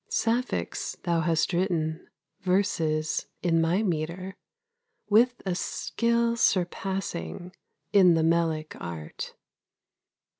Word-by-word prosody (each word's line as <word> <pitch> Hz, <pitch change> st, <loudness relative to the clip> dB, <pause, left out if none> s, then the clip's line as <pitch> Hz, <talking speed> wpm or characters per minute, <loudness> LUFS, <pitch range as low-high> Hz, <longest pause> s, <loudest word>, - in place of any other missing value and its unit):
Sapphics 235 Hz, +2 st, -1 dB
thou 170 Hz, -2 st, +1 dB
hast 165 Hz, +1 st, +1 dB
written, 170 Hz, -3 st, -1 dB, 0.3 s
Verses 165 Hz, -5 st, 0 dB, 0.2 s
in 165 Hz, -2 st, +3 dB
my 175 Hz, +6 st, +2 dB
metre, 180 Hz, +1 st, -2 dB, 0.8 s
With 240 Hz, +4 st, +5 dB
a 185 Hz, -, 0 dB
skill 235 Hz, +5 st, 0 dB
surpassing 180 Hz, -, -1 dB, 0.4 s
In 185 Hz, -4 st, +7 dB
the 160 Hz, -, +2 dB
melic 165 Hz, -2 st, +1 dB
art. 85 Hz, -3 st, -6 dB
175 Hz, 90 wpm, -27 LUFS, 160-195 Hz, 0.8 s, In